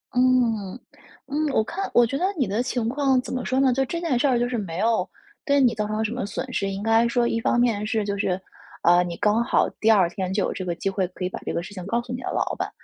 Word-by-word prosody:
嗯， 245 Hz, -5 st, +2 dB, 0.5 s
嗯。 295 Hz, +1 st, -1 dB
我 220 Hz, -, +3 dB
看 385 Hz, -, -4 dB
我 240 Hz, -, +6 dB
觉 275 Hz, +4 st, -2 dB
得 360 Hz, -, 0 dB
你 265 Hz, -, +2 dB
的 210 Hz, +5 st, 0 dB
情 245 Hz, -2 st, -2 dB
况， 270 Hz, 0 st, +2 dB
怎 -, -, -7 dB
么 255 Hz, -, -2 dB
说 260 Hz, +1 st, 0 dB
呢， 265 Hz, -2 st, +4 dB
就 270 Hz, +1 st, +1 dB
这 335 Hz, +5 st, -4 dB
件 320 Hz, -8 st, 0 dB
事 285 Hz, -, +2 dB
儿 250 Hz, -2 st, +3 dB
就 240 Hz, -, +1 dB
是 245 Hz, -1 st, -2 dB
没 175 Hz, -5 st, -4 dB
有 215 Hz, -3 st, +1 dB, 0.4 s
对 280 Hz, -1 st, +3 dB
你 245 Hz, -3 st, +4 dB
造 210 Hz, -1 st, -2 dB
成 215 Hz, +1 st, -1 dB
什 220 Hz, -, -2 dB
么 250 Hz, -2 st, -3 dB
损 255 Hz, +6 st, -5 dB
失。 195 Hz, -, -1 dB
应 195 Hz, +1 st, -5 dB
该 225 Hz, +1 st, +4 dB
说 235 Hz, 0 st, +1 dB
一 230 Hz, -, 0 dB
方 240 Hz, -, +1 dB
面 220 Hz, -4 st, +1 dB
是 215 Hz, 0 st, 0 dB
就 200 Hz, -1 st, -2 dB
是， 190 Hz, -2 st, 0 dB, 0.4 s
嗯， 175 Hz, +1 st, +5 dB
你 170 Hz, -, -6 dB
刚 215 Hz, +3 st, +2 dB
好 -, -, +2 dB
第 220 Hz, -, +2 dB
2 195 Hz, -5 st, +5 dB
天 185 Hz, 0 st, -4 dB
就 195 Hz, 0 st, 0 dB
有 -, -, -1 dB
这 185 Hz, -, -5 dB
个 175 Hz, -2 st, -2 dB
机 195 Hz, -, -2 dB
会， 190 Hz, -2 st, -1 dB
可 180 Hz, 0 st, -6 dB
以 180 Hz, -, -1 dB
把 -, -, -6 dB
这 -, -, -2 dB
个 170 Hz, -, -2 dB
事 205 Hz, -, -10 dB
情 185 Hz, -2 st, -7 dB
告 235 Hz, +3 st, 0 dB
诉 245 Hz, +1 st, -7 dB
你 250 Hz, -, -5 dB
的 -, -, -4 dB
老 -, -, -1 dB
板， -, -, -2 dB
230 Hz, 310 characters per minute, -24 LUFS, 200-255 Hz, 0.5 s, 我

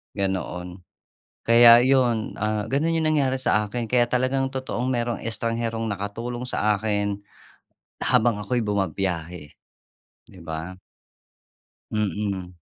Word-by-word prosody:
Ganoon. 95 Hz, -2 st, -3 dB, 0.6 s
Kaya 115 Hz, 0 st, +8 dB
'yon, 125 Hz, -4 st, +1 dB
ah, 105 Hz, 0 st, -1 dB
gano'n 155 Hz, +5 st, +1 dB
'yong 160 Hz, -1 st, +1 dB
nangyari 140 Hz, -4 st, +1 dB
sa 105 Hz, -4 st, +1 dB
akin. 115 Hz, +1 st, -4 dB
Kaya 120 Hz, 0 st, +3 dB
talagang 130 Hz, +2 st, 0 dB
totoong 130 Hz, -1 st, -3 dB
mayroong 120 Hz, -2 st, -1 dB
estrangherong 115 Hz, 0 st, -2 dB
nakatulong 115 Hz, +5 st, -5 dB
sa 105 Hz, -4 st, +1 dB
akin, 100 Hz, -1 st, -1 dB, 0.8 s
habang 110 Hz, -2 st, +2 dB
ako'y 120 Hz, +2 st, -1 dB
bumabiyahe, 90 Hz, -6 st, -3 dB, 0.8 s
'di 90 Hz, -, -15 dB
ba? 80 Hz, +3 st, -6 dB, 1.2 s
Mm. 100 Hz, -3 st, -2 dB
110 Hz, 110 wpm, -24 LUFS, 100-120 Hz, 1.2 s, Kaya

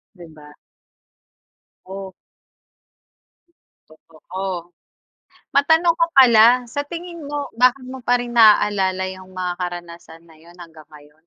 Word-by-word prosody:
'Di 175 Hz, -2 st, -13 dB
ba? 150 Hz, -1 st, -16 dB, 1.3 s
O? 190 Hz, 0 st, -9 dB, 1.8 s
Totoo. 175 Hz, +3 st, -8 dB, 0.8 s
Matanong 320 Hz, +4 st, +3 dB
ko 335 Hz, -, +4 dB
pala, 245 Hz, -1 st, +6 dB
sa 285 Hz, +5 st, -4 dB
tingin 340 Hz, +2 st, -9 dB
mo, 290 Hz, -1 st, -4 dB
bakit 255 Hz, +2 st, +2 dB
mo 260 Hz, 0 st, -9 dB
pa 245 Hz, +1 st, +2 dB
rin 240 Hz, 0 st, -6 dB
naalala 205 Hz, -4 st, +3 dB
'yong 185 Hz, 0 st, -10 dB
mga 185 Hz, -1 st, -4 dB
karanasan 170 Hz, -2 st, -8 dB
na 160 Hz, -, -19 dB
'yon, 170 Hz, +2 st, -19 dB
hanggang 160 Hz, -3 st, -14 dB
ngayon? 150 Hz, -1 st, -17 dB
190 Hz, 115 wpm, -20 LUFS, 175-255 Hz, 1.8 s, pala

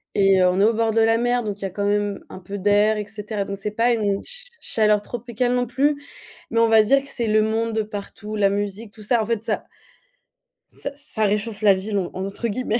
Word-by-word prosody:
et 195 Hz, -1 st, +4 dB
heu, 180 Hz, -, +5 dB
on 180 Hz, +1 st, +1 dB
est -, -, +5 dB
au 225 Hz, +2 st, +4 dB
bord 225 Hz, 0 st, +1 dB
de 225 Hz, -, +3 dB
la 225 Hz, 0 st, +4 dB
mer, 245 Hz, 0 st, +1 dB
donc 205 Hz, -1 st, -4 dB
il -, -, -9 dB
y -, -, 0 dB
a -, -, -2 dB
quand 200 Hz, +2 st, -4 dB
même 205 Hz, -1 st, 0 dB
un -, -, -9 dB
peu 195 Hz, +3 st, -7 dB
d'air, 205 Hz, +2 st, +3 dB
et 210 Hz, -, -3 dB
cetera, 210 Hz, -1 st, -4 dB
donc 200 Hz, 0 st, -5 dB
c'est 210 Hz, +2 st, -4 dB
pas 235 Hz, +3 st, +2 dB
une 205 Hz, -3 st, 0 dB
cha -, -, 0 dB, 0.2 s
chaleur 210 Hz, -2 st, +2 dB
tropicale 240 Hz, +2 st, -2 dB
non 245 Hz, -1 st, 0 dB
plus, 285 Hz, +4 st, +1 dB, 0.5 s
mais 230 Hz, 0 st, +2 dB
on 230 Hz, -, +4 dB
va 220 Hz, -1 st, +7 dB
dire 275 Hz, +6 st, +3 dB
que 280 Hz, -, -9 dB
c'est 235 Hz, -2 st, -2 dB
le 215 Hz, 0 st, +3 dB
monde 225 Hz, +1 st, 0 dB
de 220 Hz, -, +1 dB
partout, 210 Hz, 0 st, -7 dB
la 200 Hz, -1 st, +3 dB
musique, 205 Hz, +2 st, -4 dB
tout 215 Hz, -, -12 dB
ça. 230 Hz, +2 st, +2 dB
En -, -, -2 dB
fait, 230 Hz, -1 st, -2 dB
ça 220 Hz, -3 st, -2 dB, 1.1 s
«ça -, -, -5 dB
ça 280 Hz, -7 st, 0 dB
réchauffe 210 Hz, +1 st, -1 dB
la 205 Hz, -2 st, +6 dB
ville» 200 Hz, +2 st, -3 dB, 0.2 s
en 190 Hz, +1 st, -3 dB
entre 200 Hz, +4 st, -3 dB
guillemets, 230 Hz, +1 st, -1 dB
215 Hz, 255 wpm, -22 LUFS, 205-230 Hz, 1.1 s, va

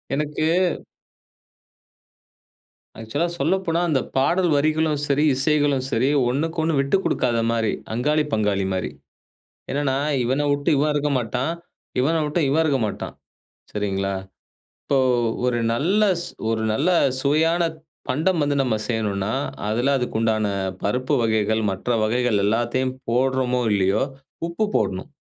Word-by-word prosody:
எனக்கு 150 Hz, +1 st, -2 dB, 2.6 s
ஆக்சுவலா 115 Hz, +10 st, -1 dB
சொல்லப்போனா, 170 Hz, +2 st, +1 dB
அந்த 145 Hz, -4 st, +2 dB, 0.2 s
பாடல் 175 Hz, +7 st, +2 dB
வரிகளும் 155 Hz, 0 st, +1 dB
சரி, 145 Hz, +1 st, +2 dB
இசைகளும் 145 Hz, -1 st, +1 dB
சரி 125 Hz, +4 st, +2 dB, 0.2 s
ஒண்ணுக்கொன்னு 160 Hz, +3 st, 0 dB
விட்டு 140 Hz, +7 st, +2 dB
கொடுக்காத 120 Hz, -2 st, +1 dB
மாரி. 115 Hz, -2 st, 0 dB, 0.2 s
அங்காளி, 150 Hz, +6 st, +1 dB
பங்காளி 105 Hz, -3 st, +1 dB
மாரி. 95 Hz, -, -2 dB, 0.8 s
என்னென்னா 135 Hz, -1 st, 0 dB, 0.3 s
இவன 135 Hz, +4 st, 0 dB
விட்டு 145 Hz, 0 st, 0 dB
இவன் 150 Hz, +2 st, +2 dB
இருக்க 145 Hz, 0 st, 0 dB
மாட்டான், 125 Hz, +6 st, -2 dB, 0.5 s
இவன 145 Hz, +6 st, +2 dB
விட்டு 150 Hz, +3 st, -1 dB
இவன் 155 Hz, +4 st, +3 dB
இருக்க 145 Hz, -4 st, +2 dB
மாட்டான். 105 Hz, -, -5 dB, 0.6 s
சரிங்களா? 100 Hz, -2 st, -1 dB, 0.7 s
இப்போ 140 Hz, -, +1 dB, 0.5 s
ஒரு 120 Hz, -1 st, +1 dB
நல்ல 175 Hz, -, +1 dB, 0.2 s
ஸ் -, -, -5 dB, 0.2 s
ஒரு 110 Hz, -1 st, 0 dB
நல்ல 140 Hz, +10 st, +1 dB, 0.3 s
சுவையான 160 Hz, +5 st, +2 dB, 0.5 s
பண்டம் 160 Hz, +6 st, +1 dB
வந்து 145 Hz, 0 st, +1 dB
நம்ம 125 Hz, -4 st, 0 dB
செய்யணுன்னா, 105 Hz, -3 st, -1 dB, 0.4 s
அதுல 120 Hz, +6 st, +1 dB
அதுக்கு 125 Hz, -3 st, -2 dB
உண்டான 110 Hz, -1 st, +1 dB, 0.4 s
பருப்பு 125 Hz, +7 st, 0 dB
வகைகள், 110 Hz, -1 st, +1 dB
மற்ற 95 Hz, +5 st, -4 dB
வகைகள் 120 Hz, 0 st, +1 dB
எல்லாத்தையும் 120 Hz, +4 st, 0 dB
போட்றோமோ 125 Hz, +1 st, +1 dB
இல்லயோ 100 Hz, +1 st, +2 dB, 0.4 s
உப்பு 170 Hz, +6 st, -1 dB
போடணும். 95 Hz, 0 st, -1 dB
130 Hz, 120 wpm, -22 LUFS, 110-150 Hz, 2.6 s, இவன்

